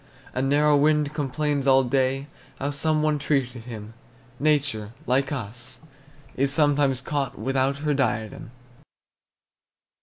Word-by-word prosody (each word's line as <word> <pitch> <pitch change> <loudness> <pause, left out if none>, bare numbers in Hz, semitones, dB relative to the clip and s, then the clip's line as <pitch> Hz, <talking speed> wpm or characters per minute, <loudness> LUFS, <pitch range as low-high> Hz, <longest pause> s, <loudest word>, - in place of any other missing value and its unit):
A 130 - -1
narrow 145 +2 +3
wind 150 0 +2
complains 145 -1 -1
all 135 0 +6
day 135 +1 0 0.3
How 140 +2 -2
some 155 +2 +1
one 155 -1 +1
treated 130 -5 -1
him; 110 -2 -8 0.5
Nature, 140 -8 0
like 135 +2 +1
us, 125 -1 -6 0.5
is 140 +1 +1
sometimes 145 -3 +2
caught 140 -1 -2
Without 135 +1 0
her 150 - +2
diadem. 120 -6 -2
135 Hz, 120 wpm, -25 LUFS, 130-145 Hz, 0.5 s, all